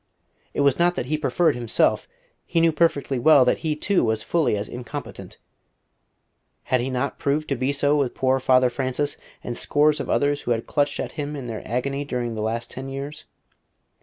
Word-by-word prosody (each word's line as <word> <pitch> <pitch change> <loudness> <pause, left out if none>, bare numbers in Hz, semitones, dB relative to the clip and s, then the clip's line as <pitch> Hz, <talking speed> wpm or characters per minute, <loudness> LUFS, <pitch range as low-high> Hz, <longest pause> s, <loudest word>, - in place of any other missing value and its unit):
It - - +1
was 140 0 +3
not 175 +1 +3
that - - -2
he 150 +4 -1
preferred 155 +3 +2
himself; 120 -2 +1 0.4
he 170 - +1
knew 165 0 +4
perfectly 145 -4 +1
well 140 0 +6
that - - +2
he, 155 -2 -1
too, 195 +5 +1
was 110 -1 0
fully 160 -10 +1
as 100 - -4
incompetent: 120 -2 -8 1.3
had 130 -1 +1
he 130 - -2
not 130 +2 -2
proved 150 +2 0
to 140 - +1
be 130 +2 0
so 145 +1 +2
with 140 -4 0
poor 130 0 +2
Father 130 -1 +3
Francis, 130 +3 -2 0.3
and 120 - -4
scores 150 +3 +2
of - - -4
others 145 0 +1
who 120 - -3
had 115 0 -3
clutched 145 -1 0
at - - -3
him 145 +1 -4
in 135 -3 -6
their 115 -2 -5
agony 140 +4 -2
during 125 -4 -3
the 110 - -4
last 115 +2 -3
ten 135 +1 -6
years? 140 +3 -6
140 Hz, 195 wpm, -23 LUFS, 125-150 Hz, 1.3 s, well